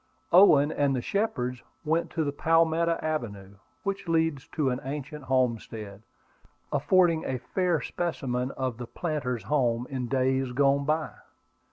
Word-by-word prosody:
Owen 155 -5 +7
and 140 -3 +1
the 125 - -1
Shepards 125 - -1 0.2
went 160 +2 +1
to 160 - -1
the 145 - -1
Palmetto 165 +2 +2
Avenue, 100 -11 -4 0.3
which 195 -2 -3
leads 160 -4 0
to 140 -4 0
an 125 - -2
ancient 145 +1 -6
homestead, 115 -5 -1 0.7
affording 165 +3 +3
a 130 - -2
fair 175 +6 0
specimen 130 -7 -2
of 130 -3 -2
the 120 - -6
planter's 140 - -3
home 120 -3 +1
in 130 -2 -3
days 130 0 0
gone 140 +1 +3
by. 155 +1 0
140 Hz, 140 wpm, -27 LUFS, 125-160 Hz, 0.7 s, Owen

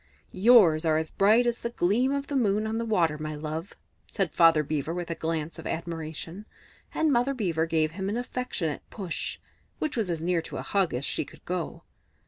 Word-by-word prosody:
"Yours 185 -6 +6
are 160 -2 +3
as 160 0 -2
bright 215 +5 +4
as 240 -1 -1
the 235 - -2
gleam 235 +5 +1
of 280 0 -1
the 285 - -4
moon 215 -4 +2
on 220 +1 -1
the 230 - -2
water, 170 -9 +1
my 155 0 -4
love," 155 +4 -5 0.3
said 190 -7 -1
Father 165 -2 +5
Beaver 155 +2 -2
with 175 -1 -4
a - - +1
glance 160 -1 -3
of - - -6
admiration; 165 +3 -5 0.4
and 315 -2 +2
Mother 250 +3 +2
Beaver 165 -8 0
gave 155 -1 +1
him 190 +3 -3
an 215 - -1
affectionate 245 - -3
push, 190 -6 -4 0.4
which 310 - -2
was 220 -6 -1
as 170 -2 -1
near 170 +1 +1
to - - -7
a - - -4
hug 195 -9 +1
as 130 +3 -2
she - - -1
could - - -16
go. 180 -2 -4
175 Hz, 205 wpm, -27 LUFS, 160-225 Hz, 0.4 s, Yours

